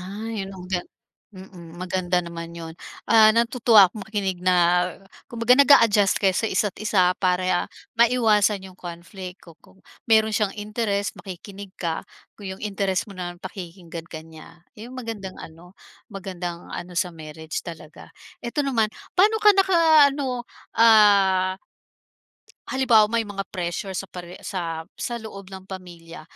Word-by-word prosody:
Ay, 205 +2 -5
anong 190 -2 -10
gan 180 -1 -1 0.5
mm, 175 -3 -12
maganda 180 0 -1
naman 170 -1 -7
'yon, 165 -1 -7 0.3
ah, 220 0 +6
natutuwa 230 -3 +5
ako 215 - -8
makinig 195 -3 -3
na 180 -1 +3 0.4
kumbaga 235 +1 +2
nag-a-adjust 230 -7 +5
kayo 195 -2 +2
sa 225 +4 0
isa't 190 0 -1
isa 190 -4 +3
para 185 -1 +1 0.3
maiwasan 215 -4 +3
yung 185 -1 -12
conflict 180 +2 -9
ku 170 - -14
kung 190 - -23 0.2
meron 220 -1 +4
siyang 210 -2 0
interest 210 -1 -2
makikinig 195 +1 -10
ka 165 -2 -3 0.3
kung 200 -2 -8
yung - - -17
interest 195 -2 -1
mo 205 - -12
naman 175 -2 -6
pakikinggan 175 -2 -9
ka 160 -1 -8
niya. 165 +1 -15
Iyong 240 +4 -11
magandang 225 -6 -6
ano, 175 +4 -13 0.3
magandang 180 -3 -7
ano 180 +1 -6
sa 180 0 0
marriage 160 0 -7
talaga. 160 -3 -11 0.3
Eto 245 +5 -2
naman 230 -6 +1 0.2
paano 415 +4 +4
ka 420 - +9
naka-ano, 300 -9 +3 0.2
ah 200 -4 +5 1.2
halimbawa 235 -5 +4
may 230 0 +1
mga 200 -1 -4
pressure 175 +2 -3
sa 195 - -4
pare 175 -1 -9
sa 185 -2 -2 0.4
sa 240 - -4
loob 200 -3 -10
ng 190 -1 -9
pamilya, 175 -4 -10
195 Hz, 140 wpm, -23 LUFS, 180-220 Hz, 1.2 s, ka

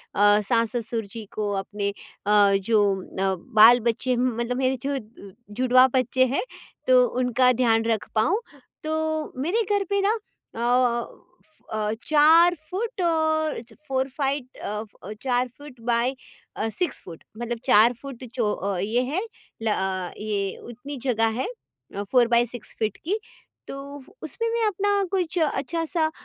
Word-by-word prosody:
अ, 205 +1 +5
सास-ससुर 230 0 0
जी 215 +2 -8
को, 210 -1 -1
अपने 200 +1 -2 0.4
अ, 205 -1 +5
जो 205 +2 +2 0.4
अ, 190 0 +1 0.2
बाल-बच्चे 235 +3 +6
हम 250 -1 0
मतलब 240 +1 -1
मेरे 260 0 +1
जो 280 -1 0 0.6
जुड़वा 255 0 +6
बच्चे 260 0 +3
हैं, 260 +2 -1 0.4
तो 255 -1 +6
उनका 250 0 +3
ध्यान 225 -2 +2
रख 225 -2 0
पाऊँ। 335 - +2 0.4
तो 315 0 -2
मेरे 360 +11 +1 0.2
घर 400 - 0
पे 400 0 +1
ना 405 +2 +3 0.4
अ 225 - -6
अ, 240 0 +2 0.4
फ 315 - -23
अ, 215 0 -1
4 320 +3 +6
फुट 420 +2 -3
और 315 -3 +1
च 235 - -16
four 265 0 0
fight 275 -2 -2
a 210 +1 -4 0.2
a, 200 - -7
4 250 -1 +1
foot 285 -4 -13
by 240 +2 +1 0.4
a, 220 - -1
6 355 +10 -2
foot 165 -3 -10
मतलब 240 0 -3
4 235 -1 +6
फुट 270 -3 -9
जो 220 -4 +1
अ, 195 0 -3
ये 220 +6 +1
है 305 +9 -1 0.4
ल - - -1
अ, 190 -2 -2
ये 205 -2 -2
उतनी 275 +5 -8
जगह 225 -2 +2
है - - -2 0.5
अ, 200 - -2
4 245 -2 +5
बाई 235 0 +3
6 240 -2 -6
फीट 215 -2 -1
की 405 +6 0 0.5
तो - - -6 0.5
उसमें 460 -1 -2
मैं 465 -1 +1
अपना 405 0 +1
कुछ 360 -3 -1
अच्छा 320 +1 0
सा 315 -1 0
250 Hz, 160 wpm, -24 LUFS, 220-305 Hz, 0.6 s, बाल-बच्चे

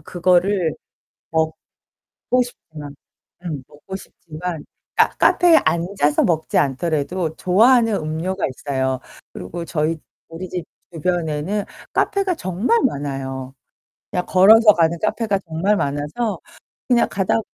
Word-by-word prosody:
그거를 180 +1 +1 0.6
먹고 160 -1 -2 0.7
싶지만 150 -11 -11 0.5
음 150 -7 -5
먹고 170 +6 -10
싶지만 165 -3 -7 0.3
카 - - +5
카페에 345 -3 +5
앉아서 170 -3 +1
먹지 160 -3 0
않더라도 155 +4 0
좋아하는 225 +5 +4
음료가 165 +4 -3
있어요. 130 -1 -2 0.3
그리고 170 - -7
저희 160 0 -1 0.3
우리 170 +3 -8
집 180 -2 -4 0.3
주변에는 175 +3 -1 0.3
카페가 395 -2 +1
정말 225 - 0
많아요. 135 - -3 0.6
그냥 180 -3 -1
걸어서 210 +4 +7
가는 170 -1 +2
카페가 215 -2 0
정말 185 +6 +1
많아서 150 +11 -2 0.5
그냥 240 -2 +4
가다 190 +3 0
170 Hz, 260 characters per minute, -20 LUFS, 150-200 Hz, 0.7 s, 걸어서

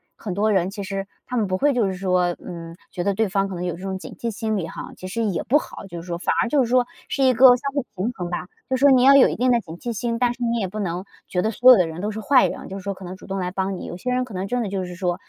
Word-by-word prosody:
很 200 - -5
多 210 +3 +1
人 185 -1 +2
其 200 +1 -6
实 195 0 -4 0.2
他 250 - -5
们 220 -4 +1
不 185 0 -1
会 285 +3 +3
就 235 -4 +2
是 190 - -3
说， 180 -2 +1
嗯， 165 -1 -8
觉 175 - -3
得 200 0 +1
对 220 +1 +1
方 195 +1 0
可 185 - -5
能 175 +1 -4
有 175 - -2
这 180 - -12
种 190 -1 -3
警 - - -10
惕 230 -1 -3
心 220 +1 -2
理 165 -3 -3
哈， - - -8
其 185 - -8
实 230 +4 -2
也 195 -5 -1
不 290 - +4
好。 255 - -6
就 170 -2 -7
是 175 - -13
说 170 -1 -3
反 - - 0
而 - - +1
就 275 +1 +3
是 230 - -3
说， 250 0 +3 0.2
是 275 - 0
一 260 - +5
个 255 +3 +8
相 275 +3 -4
互 280 - 0
平 195 +6 -1
衡 175 -1 -5
吧。 180 0 -4 0.2
就 260 - +1
说 280 +2 +5
你 255 -1 +5
要 275 +1 +8
有 275 - +8
一 - - -2
定 250 0 +2
的 240 - +4
警 165 -6 -9
惕 240 - -4
心， 230 +1 -2
但 245 -1 +2
是 245 0 -6
你 235 0 0
也 195 - -1
不 215 +4 -6
能 180 -1 -2 0.2
觉 180 - 0
得 220 - 0
所 250 +4 +7
有 240 - +8
的 180 -3 +2
人 160 +2 -7
都 210 +3 -2
是 215 - -5
坏 260 +4 +5
人。 - - -7
就 195 - -6
是 - - -12
说 200 0 -2
可 190 - -13
能 185 +1 -7
主 - - -14
动 195 0 -3
来 180 -1 -2
帮 190 0 -2
你 - - -7
有 175 - -6
些 250 +7 -3
人 255 0 +1
可 245 - -10
能 190 +1 -3
真 245 +4 -1
的 215 - -2
就 190 -1 -2
是 180 0 -8
说 180 -1 -2
195 Hz, 375 characters per minute, -23 LUFS, 180-240 Hz, 0.2 s, 个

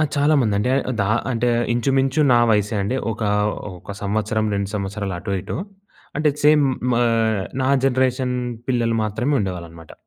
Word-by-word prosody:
ఆ! - - +4
చాలా 145 +2 +3
మంది 105 -4 +1
అండి 105 - 0
ఆహ్, - - +2 0.2
ద - - +3 0.3
అంటే 120 0 0 0.3
ఇంచుమించు 135 +3 +1
నా 120 - +5
వయసే 105 +1 +1
అండి. 125 +7 -1 0.2
ఒక 110 - -10 0.6
ఒక 100 - -9
సంవత్సరం 110 +2 0
2 100 -1 -2
సంవత్సరాలు 100 -1 -3
అటు 100 +2 -4
ఇటు. - - -5 0.6
అంటే 150 0 +3 0.2
సేమ్ 150 -1 +6 0.3
మా 120 - +2
ఆహ్, 110 -3 +1 0.2
నా 130 - +1 0.2
జనరేషన్ 130 -1 +1 0.3
పిల్లలు 115 -2 +1
మాత్రమే 120 +7 -1
ఉండేవాళ్ళు 90 -4 -4
అన్నమాట 80 -1 -13
115 Hz, 165 wpm, -21 LUFS, 100-130 Hz, 0.6 s, సేమ్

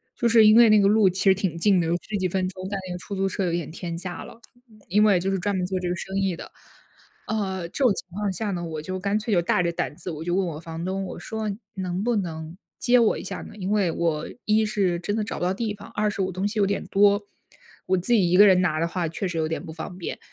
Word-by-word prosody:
就 235 - +1
是 225 -1 +7
因 215 - +7
为 235 -1 +8
那 215 -1 +6
个 200 - +4
路 210 -2 +5
其 185 +1 -2
实 195 - +6
挺 190 -4 -2
近 185 0 +3
的， 165 - -1
有 170 - +1
十 215 - -6
几 185 - 0
分 185 0 0
钟， 185 0 -7
但 200 -1 -3
那 180 - -4
个 - - -4
出 200 +2 -6
租 195 0 0
车 195 0 -2
有 170 - 0
一 - - +1
点 160 -3 -5
天 170 0 -5
价 180 0 -6
了， 230 - -12 0.5
因 210 +4 +3
为 200 -4 +5
就 195 +2 -1
是 190 - 0
专 200 +2 -1
门 180 -1 0
做 185 0 -2
这 180 -1 -2
个 180 - -1
生 190 +3 -6
意 195 -2 0
的。 - - -10 0.8
呃， 190 -5 -2
这 275 - -2
种 245 - +6
情 - - -7
况 200 +2 -2
下 210 +1 -2
呢， 175 -2 -3
我 160 -2 -5
就 185 +4 -4
干 200 +2 0
脆 215 0 -2
就 175 - +4
大 175 +1 +1
着 170 - 0
胆 165 - -3
子， 180 - -6
我 160 0 -6
就 175 +1 -1
问 190 0 +1
我 155 -2 -5
房 165 0 -6
东， 190 +1 -2
我 - - -7
说： 220 -1 -4 0.3
“能 185 0 -3
不 240 0 +1
能 160 -3 -4 0.2
接 245 0 +4
我 230 -2 +3
一 - - -7
下 - - -5
呢？ - - -11
因 190 -1 -3
为 205 -4 +2
我 160 -2 -1 0.2
一 215 +1 +3
是 195 -5 0
真 205 +4 -2
的 220 - 0
找 - - -5
不 - - -3
到 185 - +1
地 210 +1 -2
方， 205 0 -12
二 210 0 +1
是 200 - -3
我 190 - -2
东 185 +3 -1
西 210 +1 -3
有 200 - +4
点 200 - -2
多， 205 +1 +4 0.6
我 185 - +3
自 180 +7 0
己 190 -7 +4
一 180 - +4
个 205 - +9
人 185 -2 +5
拿 155 -4 +1
的 165 - +1
话 175 -1 -2
确 170 +5 -3
实 175 -2 -4
有 160 - 0
点 160 +3 -4
不 160 - -8
方 170 +2 -7
便。” 180 - -5
190 Hz, 320 characters per minute, -25 LUFS, 175-205 Hz, 0.8 s, 个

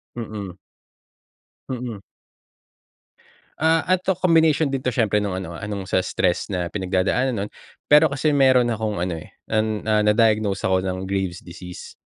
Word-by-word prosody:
Mm. 105 -5 -6 1.1
Mm. 120 -5 -5 1.6
Ah, 160 +1 +3
eto 185 +1 +2
combination 160 -4 +3
din 135 - -1
'to 125 - +1
siyempre 110 -4 +2
nung 100 -2 -1
ano, 85 -3 -5
ah, - - -6
nung 100 -2 -5
sa - - +2
stress 90 -1 0
na 90 -2 -2
pinagdadaanan 95 +7 0
nun. 105 -1 -3 0.4
Pero 150 +2 +7
kasi 140 +1 0
meron 130 -4 +4
akong 105 -4 -2
ano, 90 -2 -2
eh, 80 - -12 0.2
an, 110 -1 0
ah, 105 0 +3
na-diagnose 105 -2 +2
ako 95 0 +1
ng 95 +1 -3
Graves' 95 -3 -2
disease. 90 0 -10
105 Hz, 150 wpm, -22 LUFS, 95-130 Hz, 1.6 s, Pero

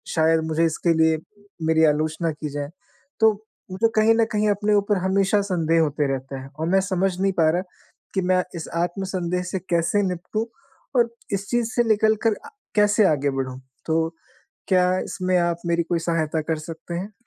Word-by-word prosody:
शायद 160 0 +4
मुझे 160 +1 +1
इसके 165 +1 +1
लिए 160 0 +3 0.5
मेरी 160 0 +4
आलोचना 155 +2 +1
की 150 0 -6
जाए। 145 0 -4 0.5
तो 220 0 +7 0.4
मुझे 205 +5 +2
कहीं 220 +1 +5
न 225 0 +3
कहीं 210 0 +2
अपने 205 +1 +1
ऊपर 205 0 +2
हमेशा 195 +2 +2
संदेह 165 -2 +2
होते 150 -1 0
रहते 135 +1 -5
हैं 135 0 -8
और 160 - -1
मैं 190 +1 +4
समझ 190 -1 0
नहीं 195 0 +2
पा 160 -1 +5
रहा 175 +2 0 0.5
कि 190 - +2
मैं 185 0 +3
इस 165 - -5
आत्मसंदेह 180 0 -2
से 190 - -1
कैसे 170 +4 +2
निपटूँ 180 +5 -3 0.5
और 235 -1 +4 0.2
इस 200 0 -2
चीज़ 240 -1 0
से 240 - +3
निकल 220 0 +4
कर 220 -2 +4
आ - - -9 0.3
कैसे 210 0 +4
आगे 145 -3 +1
बढ़ूँ? 130 -1 -3 0.3
तो 160 0 +1 0.6
क्या 185 -1 +3
इसमें 185 0 -1
आप 170 -1 +1
मेरी 170 0 +2
कोई 170 0 -1
सहायता 165 -2 0
कर 160 0 -2
सकते 165 +2 -8
हैं? 190 +5 -4
175 Hz, 185 wpm, -23 LUFS, 160-200 Hz, 0.6 s, तो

